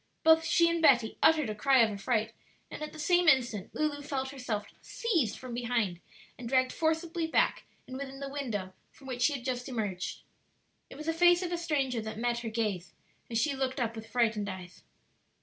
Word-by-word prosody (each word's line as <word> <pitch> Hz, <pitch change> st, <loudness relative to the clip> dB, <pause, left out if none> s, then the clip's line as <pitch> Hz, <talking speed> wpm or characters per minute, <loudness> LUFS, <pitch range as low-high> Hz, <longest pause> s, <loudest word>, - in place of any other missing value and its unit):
Both 320 Hz, 0 st, +6 dB
she 335 Hz, 0 st, +4 dB
and 335 Hz, 0 st, 0 dB
Betty 245 Hz, -7 st, +4 dB
uttered 310 Hz, -7 st, +4 dB
a -, -, -3 dB
cry 260 Hz, +3 st, +4 dB
of 220 Hz, -, +1 dB
affright, 220 Hz, +2 st, -1 dB, 0.4 s
and -, -, -7 dB
at 305 Hz, -, -4 dB
the -, -, -12 dB
same 350 Hz, +3 st, +2 dB
instant 240 Hz, -9 st, +3 dB
Lulu 300 Hz, -1 st, -1 dB
felt 275 Hz, -2 st, -3 dB
herself 240 Hz, -6 st, -3 dB, 0.2 s
seized 345 Hz, -, -1 dB
from 255 Hz, -2 st, -8 dB
behind 235 Hz, -7 st, -1 dB, 0.4 s
and 235 Hz, -2 st, -6 dB
dragged 255 Hz, 0 st, +2 dB
forcibly 325 Hz, +1 st, -1 dB
back -, -, +1 dB, 0.2 s
and 260 Hz, -, -8 dB
within 270 Hz, 0 st, -6 dB
the 275 Hz, -, -4 dB
window 230 Hz, -10 st, -4 dB, 0.2 s
from 275 Hz, -, -18 dB
which 250 Hz, -2 st, -5 dB
she 290 Hz, +4 st, +4 dB
had 250 Hz, -3 st, -6 dB
just 250 Hz, 0 st, -3 dB
emerged. 205 Hz, -7 st, -4 dB, 0.7 s
It -, -, -11 dB
was 305 Hz, -, -7 dB
the 325 Hz, -, 0 dB
face 350 Hz, +2 st, +5 dB
of 355 Hz, -, -3 dB
a 345 Hz, -, 0 dB
stranger 275 Hz, -8 st, 0 dB
that 220 Hz, 0 st, -6 dB
met 235 Hz, +1 st, 0 dB
her 235 Hz, -1 st, -4 dB
gaze 210 Hz, -6 st, -2 dB, 0.4 s
as 230 Hz, -, -1 dB
she 295 Hz, +4 st, +1 dB
looked 265 Hz, 0 st, -2 dB
up 230 Hz, -2 st, -1 dB
with 225 Hz, 0 st, -9 dB
frightened 225 Hz, -4 st, +1 dB
eyes. 185 Hz, -2 st, -9 dB
255 Hz, 200 wpm, -30 LUFS, 225-305 Hz, 0.7 s, Both